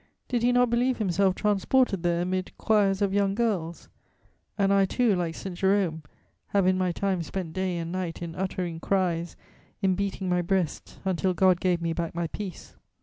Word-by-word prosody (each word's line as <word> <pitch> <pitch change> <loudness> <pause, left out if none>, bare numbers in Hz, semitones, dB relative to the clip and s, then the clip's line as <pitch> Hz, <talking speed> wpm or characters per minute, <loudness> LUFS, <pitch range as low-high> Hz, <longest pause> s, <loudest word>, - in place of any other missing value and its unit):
Did 245 -2 0
he 245 +1 +3
not 245 -1 +3
believe 245 +2 +2
himself 190 -2 +1
transported 210 0 +2
there 175 0 +1
amid 185 +1 -3
'choirs 205 -2 +2
of 195 -1 0
young 200 -1 +2
girls?' 195 -8 -1 0.7
And 200 -1 +3
I 195 -1 +4
too, 230 +1 +2
like 170 -2 -2
St. 190 -2 -6
Jerome, 190 -4 +1 0.5
'have 200 -2 +2
in 185 0 +4
my 185 -1 +1
time 190 0 -1
spent 165 0 -5
day 185 -2 -1
and 165 0 -4
night 180 -3 -3
in 170 -1 -6
uttering 180 -2 -3
cries, 175 -3 0 0.4
in 190 -2 +2
beating 195 0 -2
my 180 0 +2
breast, 175 -3 -2
until 185 0 0
God 185 -1 +4
gave 180 -2 +1
me 165 0 0
back 170 0 -3
my 170 0 -1
peace.' 185 +2 -7
185 Hz, 185 wpm, -27 LUFS, 175-200 Hz, 0.7 s, I